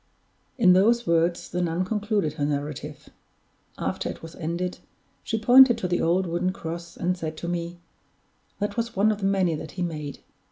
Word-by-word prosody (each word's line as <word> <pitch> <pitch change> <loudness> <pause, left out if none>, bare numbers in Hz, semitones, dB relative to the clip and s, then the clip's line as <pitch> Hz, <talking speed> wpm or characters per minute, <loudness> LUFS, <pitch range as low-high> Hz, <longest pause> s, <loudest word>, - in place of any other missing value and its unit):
In 190 -7 +6
those 230 +6 +4
words 170 0 +1
the 180 - -2
nun 175 +1 0
concluded 205 -5 -1
her 145 -2 -2
narrative. 145 -1 -4 0.7
After - - -2
it - - -8
was 165 0 -9
ended, 175 +2 -3 0.4
she 225 - -1
pointed 245 +2 +7
to 190 - -2
the 175 0 0
old 180 +3 +2
wooden 175 +2 -1
cross, 170 -1 -7
and 180 +1 0
said 160 -3 -5
to 170 - -5
me: 170 0 -3 0.8
"That 205 +1 -3
was 230 0 -2
one 205 +3 +4
of 210 - -3
the 195 - 0
many 190 -4 +2
that 155 0 -6
he 180 - -3
made. 150 -4 -5
175 Hz, 185 wpm, -25 LUFS, 165-205 Hz, 0.8 s, pointed